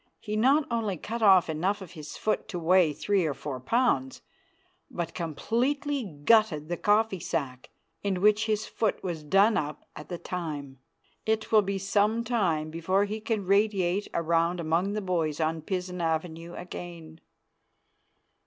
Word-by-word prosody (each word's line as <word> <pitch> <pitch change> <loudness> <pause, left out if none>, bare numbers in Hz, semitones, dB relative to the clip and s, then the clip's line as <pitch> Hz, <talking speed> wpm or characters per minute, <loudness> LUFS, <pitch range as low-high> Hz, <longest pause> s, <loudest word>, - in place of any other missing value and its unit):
He 210 -1 -4
not 275 +7 +4
only 220 -5 -1
cut 230 +8 -5
off 190 -5 +6
enough 180 +6 -1
of 190 -4 -10
his 155 -4 -9
foot 215 - -1
to 180 - -5
weigh 175 -1 +4
three 195 +5 0
or 150 -4 -1
four 135 -1 -5
pounds, 135 - 0 0.7
but 170 -1 -4
completely 250 - -1
gutted 165 -1 +2
the 175 - -2
coffee 210 -1 +2
sack 130 -5 -4 0.3
in 195 -2 -1
which 210 +2 +3
his 215 0 0
foot 215 -1 -1
was 170 -4 -3
done 195 +8 +4
up 150 0 -4
at 150 - -10
the 175 - -4
time. 150 -8 -5 0.5
It 220 0 0
will 215 -1 +7
be 200 0 -2
some 205 +4 +1
time 175 -10 0
before 185 +5 +1
he 215 +2 -4
can 215 -2 -2
radiate 200 -1 +2
around 170 +1 +1
among 170 +5 0
the 215 - -2
boys 165 -5 -1
on 160 0 0
Pizen 180 +1 -3
avenue 165 +1 -2
again. 170 -2 -9
185 Hz, 155 wpm, -28 LUFS, 160-210 Hz, 0.7 s, will